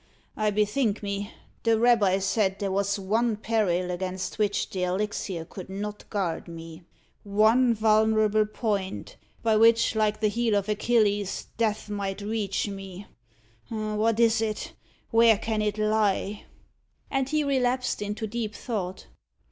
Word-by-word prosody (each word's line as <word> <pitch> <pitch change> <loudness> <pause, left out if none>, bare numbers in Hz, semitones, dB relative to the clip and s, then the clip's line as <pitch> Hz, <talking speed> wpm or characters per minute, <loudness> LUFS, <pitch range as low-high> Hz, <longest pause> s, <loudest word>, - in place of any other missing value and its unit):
Ha! 215 - -2
I - - +4
bethink 210 +2 0
me, 200 +1 -3 0.3
the 230 -1 +3
rabbi 220 -5 +4
said 195 0 0
there 200 -1 -2
was 200 +1 0
one 220 +4 +1
peril 205 -5 0
against 185 +2 -4
which 205 -1 +1
the 185 - -3
elixir 185 -2 -2
could 185 +2 -10
not 205 +2 -6
guard 190 -6 -2
me 165 0 -9 0.4
one 220 +4 +3
vulnerable 215 0 +3
point, 200 - -3 0.3
by 225 -1 +3
which, 230 +1 +5
like 215 -1 +1
the 215 - +2
heel 225 0 +1
of 200 0 0
Achilles, 210 -2 +1
death 215 -2 -1
might 200 -1 -3
reach 205 -1 -2
me! 195 -1 -8 0.6
What 215 0 0
is 225 -1 +4
it! 215 -1 -3 0.4
where 230 -2 +6
can 220 0 -2
it 210 0 -1
lie?" 215 -1 0 0.7
And 270 -1 0
he 305 0 +1
relapsed 255 -4 0
into 210 +2 -3
deep 220 0 -4
thought. 190 -6 -4
210 Hz, 140 wpm, -26 LUFS, 195-225 Hz, 0.7 s, where